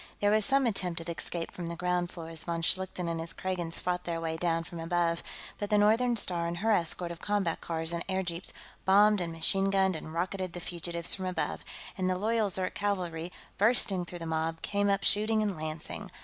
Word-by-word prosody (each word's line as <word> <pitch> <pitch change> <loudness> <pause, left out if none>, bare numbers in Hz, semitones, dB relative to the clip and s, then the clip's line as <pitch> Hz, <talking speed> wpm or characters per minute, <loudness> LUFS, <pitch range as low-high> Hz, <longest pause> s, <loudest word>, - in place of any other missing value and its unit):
There 205 0 +3
was 215 -1 +5
some 275 +2 +4
attempt 180 -6 +1
at 165 - -6
escape 170 0 -4
from 175 -2 -6
the 170 - -4
ground 180 0 0
floor 165 -2 -7
as 165 -1 -7
von 170 -1 -2
Schlichten 185 0 0
and 165 -1 -1
his 165 +1 -4
Kragans 175 -3 -3
fought 180 0 -1
their 170 -1 -2
way 165 -1 -2
down 165 0 0
from 170 0 -8
above, 170 0 +1 0.4
but 205 - -2
the 210 - +4
Northern 225 +4 +4
Star 175 -5 -1
and 170 0 -3
her 220 +5 +1
escort 175 -2 +2
of 170 - -7
combat 200 -5 0
cars 165 0 -2
and 170 - -2
airjeeps 185 -2 0 0.3
bombed 205 +1 +5
and 170 -1 -2
machine 195 +4 +1
gunned 190 -2 +3
and 155 0 -6
rocketed 185 +2 -2
the 175 - -5
fugitives 170 -1 -1
from 185 -1 -1
above, 180 -3 -2 0.4
and 185 0 +1
the 185 - +1
loyal 220 +1 +1
Zirk 185 0 0
cavalry, 180 -5 -2 0.3
bursting 205 -4 +4
through 175 - -7
the 165 - -6
mob, 160 0 -1
came 205 0 +1
up 200 0 +2
shooting 215 +1 +3
and 205 -3 -1
lancing. 155 0 -4
180 Hz, 215 wpm, -30 LUFS, 170-200 Hz, 0.4 s, was